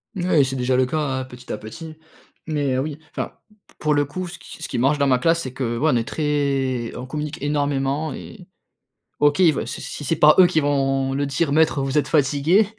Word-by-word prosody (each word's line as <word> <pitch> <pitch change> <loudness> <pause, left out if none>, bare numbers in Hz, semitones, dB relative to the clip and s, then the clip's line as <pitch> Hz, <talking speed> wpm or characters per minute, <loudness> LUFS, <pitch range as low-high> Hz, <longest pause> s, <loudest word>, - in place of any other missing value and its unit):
Mouais, 175 -6 +3
c'est 135 +1 -3
déjà 125 0 +1
le 130 - +4
cas, 135 +5 -2
hein, 135 -4 -1
petit 125 -1 -11
à - - -2
petit. 155 +10 -9 0.5
Mais 145 -4 0
oui, 145 +3 -3
enfin, - - -4 0.2
mmh - - -23
p - - -24
pour 150 0 +1
le 145 0 +2
coup, 180 +6 -5
ce - - -10
qui 160 - -11
ce - - -5
qui - - -3
marche 135 +5 +2
dans 140 -1 +2
ma 130 -2 +3
classe, 165 +5 +2
c'est 130 - -5
que, 120 -3 -2
ouais, 155 +6 +2
on - - +2
est 115 +1 -2
très 140 -5 -1
on 125 - -6
communique 150 +2 -5
énormément 145 +1 -1
et 185 -5 -10 0.7
OK, 145 +3 +3
il 175 -4 +6
veut - - -3
si - - -6
s - - -6
si - - -6
c'est 165 - +1
pas 150 0 +6
eux 185 - +9
qui 160 -3 +1
vont 135 -2 +1
le 140 +1 0
dire: 140 +2 0
«Maître, 155 -1 +3
vous 135 +2 -1
êtes 150 - +2
fatigué» 150 +7 +3
145 Hz, 245 wpm, -22 LUFS, 135-155 Hz, 0.7 s, eux